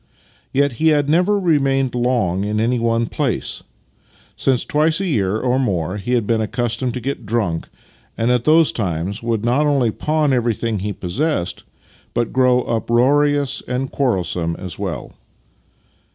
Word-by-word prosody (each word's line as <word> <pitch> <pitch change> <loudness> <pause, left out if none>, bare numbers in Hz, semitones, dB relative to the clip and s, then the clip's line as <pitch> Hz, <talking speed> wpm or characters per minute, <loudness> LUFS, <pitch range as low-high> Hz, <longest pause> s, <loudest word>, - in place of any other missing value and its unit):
Yet 140 +1 +2
he 160 - +4
had 145 -2 +3
never 180 +6 +3
remained 135 -7 +1
long 120 -7 0
in 105 +1 -1
any 120 +2 +1
one 115 0 +1
place, - - -2 0.7
since 130 -3 +1
twice 155 +2 +2
a 195 - -1
year, 110 - 0
or 125 +2 +1
more, 95 -6 -1
he 120 +5 -3
had 120 -4 +2
been 115 0 +1
accustomed 120 +2 -1
to - - -2
get 135 +2 -4
dnmk, 100 -7 -1 0.5
and 115 +2 +1
at 125 -1 +2
those 160 +2 +5
times 95 0 -3
would 115 -1 -1
not 135 +5 +2
only 135 -6 +2
pawn 150 +2 0
every 120 -3 +1
thing 115 -2 -2
he 105 +2 -3
possessed, 90 - -2 0.5
but 120 -2 -1
grow 125 -1 +3
uproarious 135 +5 +1
and 130 +1 -2
quarrel 120 -10 +1
some 85 -1 -2
as 90 +1 -7
well. 95 -5 -5
120 Hz, 160 wpm, -19 LUFS, 105-140 Hz, 0.7 s, those